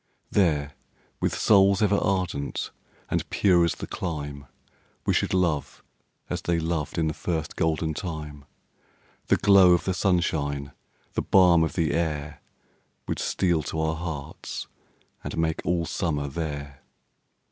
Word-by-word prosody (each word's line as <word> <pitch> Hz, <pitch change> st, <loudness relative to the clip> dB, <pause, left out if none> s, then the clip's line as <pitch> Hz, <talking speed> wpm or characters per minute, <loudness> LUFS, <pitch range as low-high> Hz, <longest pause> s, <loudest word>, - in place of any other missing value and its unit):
There, 75 Hz, -7 st, +2 dB, 0.5 s
with -, -, 0 dB
souls 100 Hz, -1 st, +5 dB
ever 105 Hz, -1 st, +3 dB
ardent 90 Hz, -9 st, -1 dB, 0.4 s
and -, -, -1 dB
pure 90 Hz, -3 st, +4 dB
as 85 Hz, -, +1 dB
the -, -, -6 dB
clime, 75 Hz, -5 st, -5 dB, 0.6 s
We -, -, +2 dB
should -, -, +1 dB
love, 85 Hz, -6 st, 0 dB, 0.4 s
as -, -, -3 dB
they 85 Hz, -1 st, 0 dB
loved 80 Hz, 0 st, -2 dB
in 80 Hz, -, +2 dB
the 80 Hz, -, 0 dB
first 80 Hz, -2 st, -3 dB
golden 80 Hz, 0 st, 0 dB
time; 75 Hz, -5 st, -6 dB, 0.8 s
The -, -, +4 dB
glow 95 Hz, -3 st, +6 dB
of 85 Hz, -, +2 dB
the 95 Hz, -, +1 dB
sunshine, 75 Hz, -7 st, 0 dB, 0.4 s
the -, -, 0 dB
balm 90 Hz, -3 st, +5 dB
of 80 Hz, -, -1 dB
the 80 Hz, -4 st, 0 dB
air, 75 Hz, -3 st, -2 dB, 0.7 s
Would -, -, -2 dB
steal 85 Hz, -4 st, +1 dB
to 80 Hz, -, -4 dB
our 80 Hz, 0 st, 0 dB
hearts, 80 Hz, -3 st, -6 dB, 0.6 s
and -, -, -5 dB
make 80 Hz, -1 st, 0 dB
all 85 Hz, 0 st, +1 dB
summer 80 Hz, -4 st, -1 dB
there. 70 Hz, -2 st, -5 dB
80 Hz, 140 wpm, -26 LUFS, 75-90 Hz, 0.8 s, glow